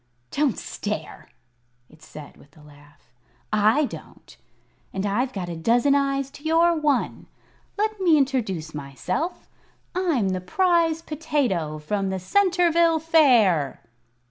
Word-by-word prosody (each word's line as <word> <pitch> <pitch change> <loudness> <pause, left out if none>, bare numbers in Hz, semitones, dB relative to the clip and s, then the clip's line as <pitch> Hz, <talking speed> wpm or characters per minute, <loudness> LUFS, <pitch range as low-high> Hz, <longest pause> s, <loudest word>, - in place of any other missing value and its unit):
"Don't 290 -4 0
stare!" 205 -7 -6 0.6
it 155 +3 -21
said, 150 -1 -12
with 145 +2 -21
a 150 - -17
laugh. 145 -3 -20 0.4
"I 215 +8 +3
don't, - - -11 0.6
and 190 +1 -3
I've 240 +6 0
got 190 -6 -5
a 170 - -5
dozen 235 - +2
eyes 275 -1 0
to 290 - -14
your 335 +2 +3
one. 295 -5 -1 0.5
Let 430 0 -1
me 335 -4 +5
introduce 220 - -1
myself. 150 - -4 0.5
I'm 330 - 0
the 185 -1 -2
Prize 330 - +1
Potato 275 - -2
from 195 +6 -2
the 190 - -2
Centerville 340 - +2
Fair." 240 - +3
255 Hz, 125 wpm, -24 LUFS, -, 0.6 s, me